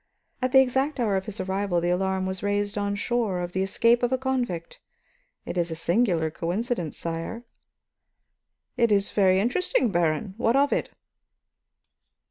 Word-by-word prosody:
At 255 0 0
the 265 - +8
exact 265 +3 0
hour 215 -5 +1
of 190 +2 -2
his 215 0 -6
arrival, 190 -1 -1
the 175 +1 0
alarm 190 +1 0
was 190 0 -3
raised 205 0 -1
on 205 -1 -1
shore 215 -3 -1
of 175 0 -4
the 190 - -1
escape 230 +5 +3
of 245 0 +1
a 260 - +2
convict. 250 -10 -3 0.7
It 180 - -3
is 170 0 0
a 160 - -4
singular 170 -3 +1
coincidence, 175 - -3
sire." 165 +8 -5 1.3
"It 235 -2 +3
is 200 -1 +2
very 190 -2 +4
uninteresting, 245 - +1
Baron. 170 +2 0
What 235 0 +2
of 280 +1 +3
it?" - - -1
200 Hz, 160 wpm, -25 LUFS, 180-240 Hz, 1.3 s, the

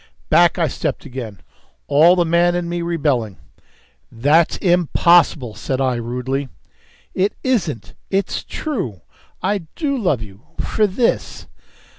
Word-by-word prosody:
Back - - +5
I - - +2
stepped - - -3
again, 115 -7 -7 0.4
all 165 +5 +5
the 175 -1 +2
man 170 +1 +3
in 175 -1 -2
me 175 0 -3
rebelling. 145 - -1 0.7
"That's 145 +8 +2
impossible," 170 - +3
said 130 +5 -3
I 130 -1 +1
rudely. 125 +3 -3 0.6
"It 195 +2 0
isn't. 180 - -1 0.2
It's 195 0 -1
true. 190 - -4 0.4
I 195 -3 -1
do 290 -4 -1
love 175 - 0
you 100 -1 -13 0.2
for 215 -1 +1
this!" 230 +5 -1
165 Hz, 125 wpm, -19 LUFS, 125-185 Hz, 0.7 s, Back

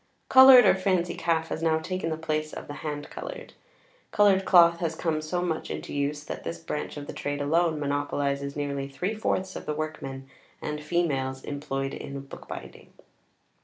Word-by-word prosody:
|xix| - - -44
Coloured 260 -1 +10
or - - +7
fancy 185 -2 0
calf 160 -1 0
has 160 - -3
now 160 -1 +2
taken 175 +1 -3
the 160 - -2
place 155 -1 -2
of - - -7
the 145 - -7
hand 150 -1 -4
coloured. - - -8 0.6
Coloured 195 -2 +4
cloth 170 -2 +6
has 165 -2 -2
come 160 -2 -1
so 175 +3 -2
much 165 -3 -2
into - - -5
use, 145 +1 -1
that - - -7
this 85 0 -4
branch 115 - -5
of 145 - -6
the - - -7
trade 145 0 -3
alone 160 +2 +1
monopolizes 140 -1 -1
nearly 140 -2 -3
three 180 +10 -3
fourths 190 -3 -2
of - - -7
the 150 - -1
workmen 135 -4 -5 0.3
and 150 0 -4
females 140 -5 -1
employed 135 -1 -3
in 140 0 -6
bookbinding. 135 - -10
155 Hz, 180 wpm, -27 LUFS, 145-175 Hz, 0.6 s, Coloured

